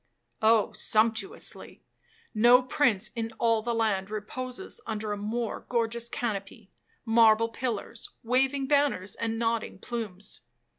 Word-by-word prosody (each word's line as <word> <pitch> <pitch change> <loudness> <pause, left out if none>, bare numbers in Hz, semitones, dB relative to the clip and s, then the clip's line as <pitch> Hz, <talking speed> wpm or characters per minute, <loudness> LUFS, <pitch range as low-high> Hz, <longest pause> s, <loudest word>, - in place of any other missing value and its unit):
'—'Oh, 220 -1 +4
sumptuously. 220 -2 0 0.5
No 240 +3 +6
prince 240 -6 +1
in 225 -1 -3
all 230 -2 +2
the 235 +1 -2
land 205 -4 0
reposes 245 +4 -5
under 215 -1 -3
a - - 0
more 220 +3 -3
gorgeous 235 0 -1
canopy,—marble 225 +1 0
pillars, 230 -1 -4
waving 265 +3 +2
banners, 275 -9 +1
and 225 -1 -2
nodding 230 -3 -1
plumes. 205 -3 -5
225 Hz, 110 wpm, -28 LUFS, 215-240 Hz, 0.5 s, No